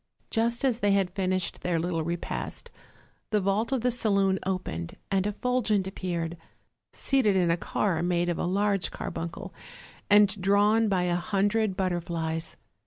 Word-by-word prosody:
Just 235 +3 +1
as 245 -3 +1
they 205 -3 +3
had 190 -3 +1
finished 185 -1 -1
their 175 -2 0
little 165 -1 -1
repast 170 +1 -4 0.6
the 210 - +2
vault 200 +5 0
of 265 -3 +1
the 250 +1 +2
saloon 200 -5 +2
opened, 130 - -3 0.2
and 195 0 +2
Effulgent 215 -2 0
appeared, 175 -3 -3 0.5
seated 255 -8 +2
in 175 -3 +3
a - - +3
car 175 -1 -1
made 175 0 +1
of 175 - -1
a - - 0
large 195 +1 +1
carbuncle, 165 0 -6 0.6
and 205 -1 +5
drawn 205 +3 +3
by 185 -3 +1
a 175 -1 +1
hundred 200 +3 0
but 190 -1 +1
terflies. 165 -2 -3
190 Hz, 155 wpm, -27 LUFS, 175-210 Hz, 0.6 s, and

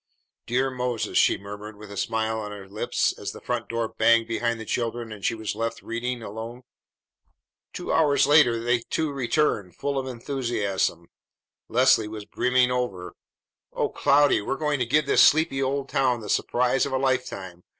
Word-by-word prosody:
"Dear 130 +3 +1
Moses!" 125 -3 -3
she - - +4
murmured 105 +2 -9
with 105 -1 -11
a - - -7
smile 110 +2 -1
on 105 -1 -5
her 100 -2 -9
lips 100 +2 0
as - - -5
the - - -10
front 120 -3 -3
door 115 -1 -1
banged 115 +1 +3
behind 115 0 -1
the 110 - -7
children 115 0 -3
and 105 -2 -9
she 115 - +1
was 110 -1 -4
left 115 +1 -4
reading 120 +1 -3
alone. 115 +4 -7 1.1
Two - - -4
hours 145 -4 +4
later 145 -5 +5
the 120 +1 +1
two 160 -2 -1
returned 125 - 0
full 140 -1 -2
of 130 - -5
enthusiasm. 115 - -2 0.6
Leslie 125 -2 +4
was 105 -1 -7
brimming 125 +2 +2
over. 95 -9 -3 0.6
"O - - 0
Cloudy, 145 -5 +3
we're 120 - -2
going 150 -2 0
to 125 - 0
give 150 +4 +3
this - - +4
sleepy 150 -3 +4
old 135 +1 -1
town 125 -3 +1
the 105 - -8
surprise 125 +3 +1
of 135 - -6
a - - +2
lifetime! 125 -9 -2
120 Hz, 175 wpm, -25 LUFS, 110-130 Hz, 1.1 s, later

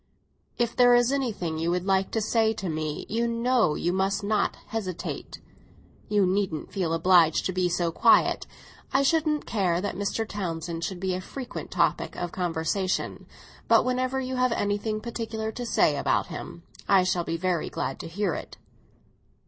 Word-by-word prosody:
"If 235 -1 0
there 245 -1 +6
is 240 +1 +4
anything 215 - -2
you 165 +1 0
would 180 +1 0
like 195 -1 +2
to 225 - -1
say 220 +1 +2
to 195 -3 -5
me, 155 -1 -3
you 230 +2 0
know 235 -6 +2
you 175 - -1
must 195 +2 0
not 210 0 +1
hesitate. 195 -6 -5 0.7
You 205 -2 +3
needn't 185 -4 -1
feel 180 -5 -1
obliged 165 -2 +4
to 185 - -1
be 180 -1 +1
so 175 -1 0
quiet. - - +4 0.4
I 270 - +3
shouldn't 305 +1 +1
care 185 -6 +1
that 200 +2 -2
Mr. 205 +2 -2
Townsend 170 -4 -4
should 180 +2 -3
be 190 0 -1
a 185 - -3
frequent 255 +6 -7
topic - - 0
of 175 -1 -4
conversation, 180 +2 -2 0.4
but - - +5
whenever 255 +1 0
you 260 0 -3
have 255 -1 +2
anything 205 +1 -1
particular 225 -2 -4
to 245 +2 -5
say - - +3
about - - +1
him - - -8 0.3
I 195 -2 +6
shall 180 -1 0
be 165 0 -2
very 175 -1 -1
glad 135 - -3
to - - -6
hear 180 +1 -1
it." - - -7
195 Hz, 175 wpm, -26 LUFS, 175-230 Hz, 0.7 s, there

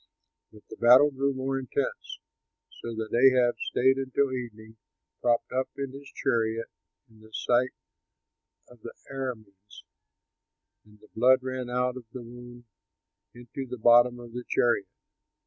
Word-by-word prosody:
But 105 -1 -17
the - - -11
battle 130 +5 +6
grew 140 +1 0
more 135 +1 -2
intense, 130 -3 -4 0.6
so 115 -1 -6
that 110 0 -4
Ahab 125 -1 +5
stayed 130 +1 +2
until 135 0 0
evening 110 -3 -7 0.4
propped 120 -1 +1
up 130 +1 -1
in 140 -1 -4
his 140 +1 -11
chariot 115 0 -1 0.4
in 110 -2 -22
the 110 0 -18
sight 120 +3 +1 1.0
of 125 -2 -19
the 115 - -9 0.2
Arameans, 110 -7 -7 1.0
and 105 0 -21
the - - -18
blood 130 +3 +4
ran 130 -1 -4
out 125 +1 -1
of 125 - -10
the 125 - -7
wound 120 +1 -12 0.7
into 120 +3 -8
the 125 - -6
bottom 120 +2 +5
of 120 -1 -11
the 125 0 -5
chariot. 120 -5 +2
120 Hz, 145 wpm, -27 LUFS, 115-130 Hz, 1.0 s, battle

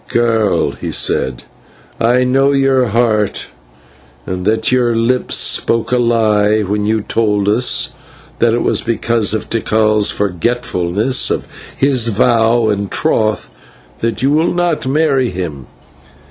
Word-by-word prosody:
"Girl," 115 -3 0
he - - -7
said, 65 -1 0 0.6
"I 125 +2 +2
know 135 +2 +2
your 135 -2 +2
heart 110 -2 0 0.8
and 90 0 -5
that 110 +3 0
your 120 -2 +1
lips 120 +3 0
spoke 115 0 +1
a 125 - +2
lie, 110 -3 +2
when 105 +1 -2
you 110 0 0
told 105 -2 -1
us 115 +5 +2 0.5
that 120 - +3
it 120 - -1
was - - +1
because 115 -2 0
of 110 - -4
Tikal's 110 -2 +1
forgetfulness 105 +2 -1
of - - -3 0.3
his 130 -4 +2
vow 115 +1 +2
and 100 -1 -2
troth 110 -1 0 0.5
that 115 +2 -3
you 135 - +2
will 160 +3 +1
not 175 -6 -1
marry 135 -3 +1
him. 85 - -6
115 Hz, 130 wpm, -15 LUFS, 105-125 Hz, 0.8 s, that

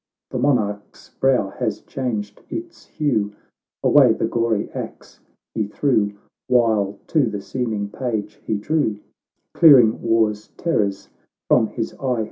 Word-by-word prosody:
The - - -2
monarch's 105 -7 -1
brow 130 -7 +2
has 115 -4 -2
changed 110 -6 -4
its 340 +1 -7
hue, 110 -9 -1 0.5
Away 135 -6 +6
the - - -1
gory 115 -2 0
axe - - -8 0.3
he 110 -3 -1
threw, 105 -3 +1 0.3
While 110 -5 +2
to 150 -6 +2
the 105 -1 -4
seeming 110 -1 -3
page 105 -2 -4
he 110 - -1
drew, 110 -2 0 0.6
Clearing 130 -9 +6
war's 110 -2 +1
terrors 100 - -1 0.4
from - - +4
his - - -4
eye. 125 -3 0
110 Hz, 125 wpm, -21 LUFS, 105-130 Hz, 0.6 s, Away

